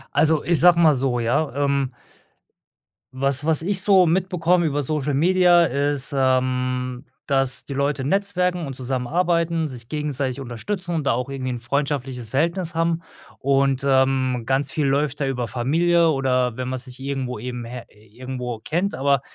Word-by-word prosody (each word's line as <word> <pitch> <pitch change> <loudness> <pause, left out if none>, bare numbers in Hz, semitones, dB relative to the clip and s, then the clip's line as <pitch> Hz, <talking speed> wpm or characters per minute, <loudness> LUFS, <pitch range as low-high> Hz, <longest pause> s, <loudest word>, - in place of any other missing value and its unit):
Also, 155 +2 +3
ich 170 -2 +2
sage 175 0 +6
mal 160 -3 +6
so, 125 -2 0
ja, 140 +6 0
ähm 140 -2 0 1.2
was 135 +2 -1
was 160 0 +1
ich 190 +1 -1
so 190 -3 +5
mitbekomme 175 -1 +1
über 145 0 -1
Social 145 0 -1
Media 175 +2 +5
ist, 140 -1 -1
ähm, 125 0 0 0.2
dass 135 -2 0
die 140 - -6
Leute 140 0 -1
netzwerken 180 0 0
und 135 - -6
zusammenarbeiten, 165 +6 0
sich 120 -4 -10
gegenseitig 145 -3 -3
unterstützen 170 - -4
und 150 -3 -2
da - - +3
auch 125 +3 -3
irgendwie 130 -2 -4
‘n 120 -1 -3
freundschaftliches 135 -2 -2
Verhältnis 170 - -1
haben. 165 0 0 0.4
Und, 135 0 +1
ähm, 130 -2 +2
ganz 135 +1 0
viel 150 0 -1
läuft 145 +1 0
da 140 - +1
über 125 -3 -2
Familie 165 +8 +2
oder 130 -3 +1
wenn 130 0 -3
man 130 - -2
sich 125 0 -12
irgendwo 135 -4 -4
eben 125 +1 -5
he 125 +1 -7 0.4
irgendwo 125 -3 -5
kennt, 175 - -1
aber, 140 0 +2
140 Hz, 160 wpm, -22 LUFS, 130-160 Hz, 1.2 s, sage